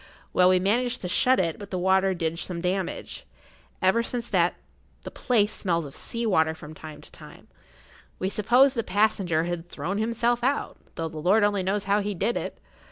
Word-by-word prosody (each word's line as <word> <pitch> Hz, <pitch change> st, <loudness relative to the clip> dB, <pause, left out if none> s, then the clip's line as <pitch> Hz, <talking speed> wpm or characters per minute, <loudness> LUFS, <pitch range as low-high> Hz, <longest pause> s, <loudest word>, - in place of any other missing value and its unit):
Well, 180 Hz, 0 st, +5 dB
we 185 Hz, 0 st, +4 dB
managed 240 Hz, +6 st, 0 dB
to 180 Hz, -, -3 dB
shut 255 Hz, +7 st, +3 dB
it, 165 Hz, -3 st, -1 dB
but 200 Hz, -1 st, -9 dB
the 185 Hz, -, -3 dB
water 190 Hz, +1 st, +2 dB
did 165 Hz, -1 st, -2 dB
some 175 Hz, -1 st, -4 dB
damage. 185 Hz, +1 st, -3 dB, 0.6 s
Ever 190 Hz, +5 st, +4 dB
since 235 Hz, 0 st, -4 dB
that 175 Hz, -3 st, +2 dB, 0.5 s
the[Pg -, -, -7 dB
64] -, -, -15 dB
place 215 Hz, -4 st, +3 dB
smells 170 Hz, -4 st, -1 dB
of 140 Hz, -, -10 dB
sea 235 Hz, 0 st, -4 dB
water 160 Hz, -6 st, +2 dB
from 155 Hz, -1 st, -11 dB
time 155 Hz, -1 st, -10 dB
to -, -, -16 dB
time. -, -, -14 dB, 0.7 s
We 185 Hz, -, -2 dB
supposed 245 Hz, +7 st, +4 dB
the 230 Hz, -, -1 dB
passenger 195 Hz, -6 st, +1 dB
had 175 Hz, -1 st, -3 dB
thrown 185 Hz, +3 st, -4 dB
himself 235 Hz, +2 st, 0 dB
out, 275 Hz, +3 st, -1 dB, 0.2 s
though 165 Hz, -, -3 dB
the 160 Hz, -1 st, -8 dB
Lord 195 Hz, +7 st, +3 dB
only 205 Hz, -1 st, +2 dB
knows 195 Hz, +2 st, -1 dB
how 200 Hz, +1 st, +2 dB
he 205 Hz, 0 st, -3 dB
did 230 Hz, +7 st, 0 dB
it. -, -, -4 dB
190 Hz, 200 wpm, -26 LUFS, 175-220 Hz, 0.7 s, Well